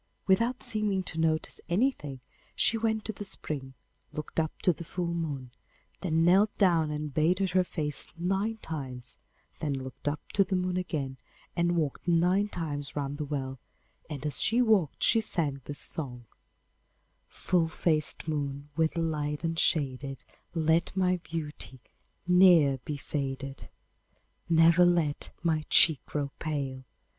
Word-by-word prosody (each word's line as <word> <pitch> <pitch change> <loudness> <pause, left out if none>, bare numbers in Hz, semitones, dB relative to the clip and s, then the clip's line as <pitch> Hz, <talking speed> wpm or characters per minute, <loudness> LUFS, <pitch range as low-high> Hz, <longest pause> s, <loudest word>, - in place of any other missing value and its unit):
Without 230 +6 +2
seeming 210 -3 0
to 165 - -6
notice 160 -1 0
anything, 170 - 0 0.3
she 230 - +3
went 220 -1 0
to 220 - -3
the 205 - -7
spring, 140 -8 -4 0.4
looked 155 +2 -4
up 160 -1 0
to 180 - +4
the 170 - -8
full 170 +1 -3
moon, 145 -7 -4 0.5
then 165 -3 +1
knelt 195 +4 +4
down 170 -5 +3
and 150 -1 -4
bathed 180 +6 +2
her 185 0 +4
face 150 -5 -2
nine 195 +6 0
times, 130 -6 -6 0.4
then 145 -3 -1
looked 130 +2 -8
up 145 +1 0
to 200 - +4
the 190 - -2
moon 180 0 0
again 145 -7 -3 0.4
and 175 0 +2
walked 155 +1 -2
nine 180 +4 +3
times 150 -7 -4
round 145 0 -3
the 150 - -2
well, 135 -2 -4 0.5
and 150 -2 -6
as 150 -2 +4
she 230 +2 +3
walked 215 - +2
she 225 - +4
sang 150 -10 -2
this 145 - -5
song: 125 -6 -2 1.0
'Full 175 -3 0
faced 160 -2 +1
moon 145 -2 -3
with 160 +1 +1
light 150 -2 -1
unshaded, 140 -5 0 0.3
Let 165 +3 +1
my 185 -1 +3
beauty 155 -5 -6 0.5
ne'er 175 -7 +6
be 150 - -3
faded. 135 -1 -4 0.8
Never 165 +1 +6
let 170 -5 +2
my 160 -2 +1
cheek 160 -5 +5
grow 145 -2 -2
pale! 135 -4 -3
160 Hz, 145 wpm, -29 LUFS, 145-180 Hz, 1.0 s, ne'er